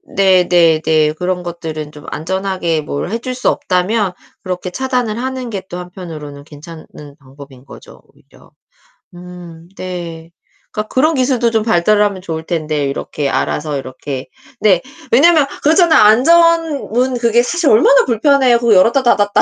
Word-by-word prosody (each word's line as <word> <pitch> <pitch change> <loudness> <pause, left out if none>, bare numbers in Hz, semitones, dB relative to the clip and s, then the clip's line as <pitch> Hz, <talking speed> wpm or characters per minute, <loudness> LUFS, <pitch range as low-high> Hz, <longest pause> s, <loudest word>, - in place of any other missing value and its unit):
네 185 -2 +3
네 165 -3 +3
네. 155 -1 +2
그런 180 +2 -3
것들은 160 -3 -6
좀 150 -1 -14
안전하게 185 -1 -2
뭘 145 +2 -5
해 230 - -1
줄 255 +2 -5
수 250 - 0
없다면 185 +2 -1 0.3
그렇게 180 -1 -4
차단을 250 0 -2
하는 260 0 -4
게 200 -4 -5
또 175 - -6
한편으로는 160 -6 -9
괜찮은 155 +2 -12 0.3
방법인 135 -1 -15
거죠, - - -15
오히려. - - -23 0.6
음 175 -2 -12
네. 170 -3 -7 0.4
그러니까 215 0 -6
그런 310 +5 +2
기술도 250 -3 +1
좀 220 -1 0
발달하면 205 0 +1
좋을 160 -2 -5
텐데 155 -4 -2
이렇게 140 +1 -4
알아서 150 +1 -2
이렇게 130 0 -7 0.3
네. 190 -5 +3 0.3
왜냐하면 305 +4 +5 0.2
그렇잖아요. 320 +1 +4
안전문 275 0 +3
그게 235 0 +2
사실 340 +3 0
얼마나 - - +5
불편해요. 255 +1 +3
그 235 -2 +3
열었다 230 +8 +4
닫았다. 205 -4 +2
185 Hz, 330 characters per minute, -15 LUFS, 160-245 Hz, 0.6 s, 왜냐하면